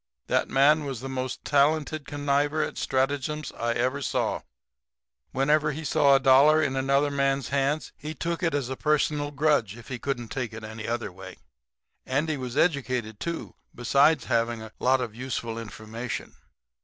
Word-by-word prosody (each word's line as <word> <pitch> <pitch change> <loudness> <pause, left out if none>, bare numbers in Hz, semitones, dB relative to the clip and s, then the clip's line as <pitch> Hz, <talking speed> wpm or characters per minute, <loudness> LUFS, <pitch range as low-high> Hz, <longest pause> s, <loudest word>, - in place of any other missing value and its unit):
That - - +1
man 150 +3 +4
was 135 -4 -4
the 135 - -6
most 130 -1 -4
talented 150 +1 +2
conniver 145 +1 0
at - - -8
stratagems 145 +3 -1
I 115 0 -1
ever 130 +4 0
saw. 130 - -1 0.9
Whenever 150 +3 +2
he 160 +3 -6
saw 140 -2 +4
a - - +5
dollar 140 +4 +6
in 140 -4 0
another 140 +2 +2
man's 140 -2 0
hands 140 0 0
he 155 +2 -7
took 170 +4 -3
it 165 -4 +1
as 140 -4 -1
a 130 - -4
personal 150 0 +1
grudge, 145 -8 +1
if 120 - -13
he 125 -2 -4
couldn't 120 -3 -3
take 125 -5 -4
it 110 0 -8
any 110 0 -7
other 115 -3 -2
way. 95 +2 -11 0.7
Andy 150 +4 0
was 130 -1 -5
educated, 130 - 0
too, 170 -1 -4 0.2
besides 140 +3 +3
having 115 -2 0
a 110 - -10
lot 130 0 +3
of 115 -4 -4
useful 115 -2 -4
information. 115 +2 -6
135 Hz, 165 wpm, -26 LUFS, 120-145 Hz, 0.9 s, dollar